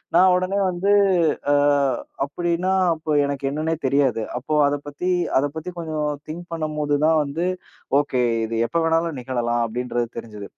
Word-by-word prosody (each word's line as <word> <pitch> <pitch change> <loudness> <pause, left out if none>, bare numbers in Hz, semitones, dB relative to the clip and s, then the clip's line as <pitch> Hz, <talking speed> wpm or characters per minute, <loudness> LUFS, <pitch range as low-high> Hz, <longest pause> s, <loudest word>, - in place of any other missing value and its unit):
நான் 185 +1 +6
உடனே 185 +2 0
வந்து 185 +3 0 0.6
அ, - - +4 0.7
அப்டின்னா 175 +5 -1 0.2
அப்போ 155 -1 -5
எனக்கு 140 -1 -3
என்னன்னே 155 +3 -1
தெரியாது. 130 -5 +2 0.2
அப்போ 155 +4 -4
அதப் 145 0 -2
பத்தி 145 +6 -3 0.3
அதைப் 145 +2 -2
பத்தி 160 +3 -5
கொஞ்சம் 155 -2 -2 0.2
திங்க் 175 +2 -7
பண்ணும்போது 150 -2 -1
தான் 160 -1 +4
வந்து, 160 +5 -2 0.5
ஓகே 135 -3 -1 0.3
இது 115 0 -3
எப்ப 170 - -2
வேணாலும் 165 -3 0
நிகழலாம் 120 -2 -1
அப்டின்றது 120 +1 -2
தெரிஞ்சது. 105 -3 -7
150 Hz, 150 wpm, -22 LUFS, 130-170 Hz, 0.7 s, நான்